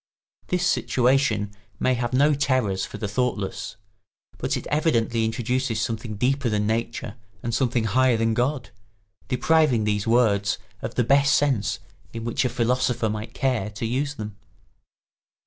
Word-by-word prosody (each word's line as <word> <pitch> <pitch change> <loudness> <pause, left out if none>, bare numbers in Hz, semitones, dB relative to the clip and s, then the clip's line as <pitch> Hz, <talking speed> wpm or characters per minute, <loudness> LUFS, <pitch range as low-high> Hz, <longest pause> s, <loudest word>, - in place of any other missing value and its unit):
This 180 -1 0
situation 125 - +2 0.3
may 130 - +2
have 120 -1 -2
no 145 +4 +4
terrors 130 -9 +1
for - - -8
the 105 - -3
thoughtless; 105 -3 -2 0.6
but - - -1
it - - -7
evidently 120 -7 +1
introduces 120 +1 -1
something 115 -1 -3
deeper 130 +3 +1
than 105 -1 0
Nature 115 +1 -2 0.3
and 115 - -2
something 120 -2 +1
higher 125 +2 +3
than 115 0 +1
God, 125 -1 -1 0.6
depriving 135 -2 +3
these 105 0 0
words 105 -4 +3 0.2
of 115 +1 -5
the 125 - +2
best 140 +4 +4
sense 120 -6 +1 0.4
in 115 -1 -5
which 120 +3 0
a 125 - +1
philosopher 125 -1 +1
might 110 +3 -6
care 125 -6 0
to 110 +2 -5
use 135 +5 -1
them. 105 -5 -7
120 Hz, 145 wpm, -24 LUFS, 110-130 Hz, 0.6 s, no